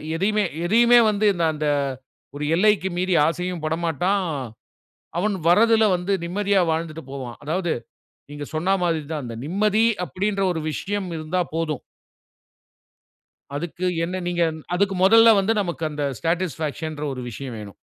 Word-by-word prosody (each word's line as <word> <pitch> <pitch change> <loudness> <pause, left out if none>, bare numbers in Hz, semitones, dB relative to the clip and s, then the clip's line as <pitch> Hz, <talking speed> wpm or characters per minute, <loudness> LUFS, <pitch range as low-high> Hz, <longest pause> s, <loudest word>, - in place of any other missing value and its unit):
எதையுமே, 210 +4 +1 0.2
எதையுமே 235 +5 +6
வந்து 210 0 0
இந்த 175 -2 -2
அந்த 150 0 -2 0.7
1 145 - -4
எல்லைக்கு 200 -1 +3
மீறி 185 +1 0
ஆசையும் 175 0 -3
படமாட்டான். 170 +4 0 1.0
அவன் 205 +3 +1
வரதில 225 +5 +5
வந்து, 180 +3 -2
நிம்மதியா 200 +2 +1
வாழ்ந்துட்டு 160 0 -3
போவான். 125 -4 -6
அதாவது, 170 +2 -1 0.6
நீங்க 145 0 -6
சொன்னா 170 +5 +1
மாதிரி 165 -3 0
தான். 150 - -3
அந்த 115 -1 -6
நிம்மதி 210 +7 +2 0.2
அப்பிடின்ற 195 +2 -2
1 165 - -3
விஷயம் 200 +3 -3
இருந்தா 160 +3 -2
போதும். 165 -2 -2 1.7
அதுக்கு 170 +4 -4 0.2
என்ன 185 +2 -3
நீங்க, 175 -1 0 0.3
அதுக்கு 195 +1 +1
மொதல்ல 225 +3 +7
வந்து, 200 +3 +1
நமக்கு 170 -3 -4
அந்த 150 -1 -3 0.2
ஸாடிஸ்ஃபாக்சன் 160 -2 -2
ன்ற, 150 - -4
1 130 - -6
விஷயம் 130 +1 -7
வேணும். 100 -2 -10
175 Hz, 135 wpm, -23 LUFS, 155-200 Hz, 1.7 s, மொதல்ல